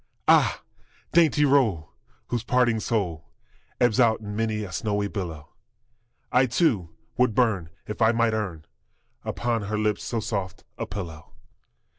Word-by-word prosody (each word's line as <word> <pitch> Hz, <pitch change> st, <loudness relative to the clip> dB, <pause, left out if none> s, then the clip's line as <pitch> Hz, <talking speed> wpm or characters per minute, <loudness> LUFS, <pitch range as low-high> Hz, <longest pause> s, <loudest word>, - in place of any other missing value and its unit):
Ah, -, -, +4 dB, 0.5 s
dainty 155 Hz, -3 st, +4 dB
roll, 115 Hz, -, +2 dB, 0.4 s
whose 120 Hz, -2 st, -1 dB
parting 120 Hz, -2 st, +2 dB
soul 85 Hz, -10 st, -2 dB, 0.5 s
Ebbs 120 Hz, -3 st, +3 dB
out 115 Hz, -3 st, +4 dB
in 105 Hz, -1 st, -7 dB
many 110 Hz, -1 st, -1 dB
a 95 Hz, -, -7 dB
snowy 100 Hz, +3 st, -1 dB
billow, 85 Hz, -8 st, -6 dB, 0.8 s
I, 130 Hz, +1 st, +4 dB
too, 115 Hz, -, +1 dB, 0.3 s
would 125 Hz, -3 st, +2 dB
burn 105 Hz, -10 st, +2 dB, 0.2 s
if 105 Hz, -, -6 dB
I 110 Hz, -, +6 dB
might 115 Hz, -1 st, +2 dB
earn 90 Hz, -8 st, -3 dB, 0.6 s
Upon 120 Hz, -2 st, -1 dB
her 105 Hz, +2 st, -2 dB
lips 105 Hz, -1 st, 0 dB
so 115 Hz, -, -2 dB
soft 100 Hz, -4 st, -4 dB
a -, -, -4 dB
pillow! 85 Hz, -6 st, -7 dB
110 Hz, 140 wpm, -25 LUFS, 95-120 Hz, 0.8 s, I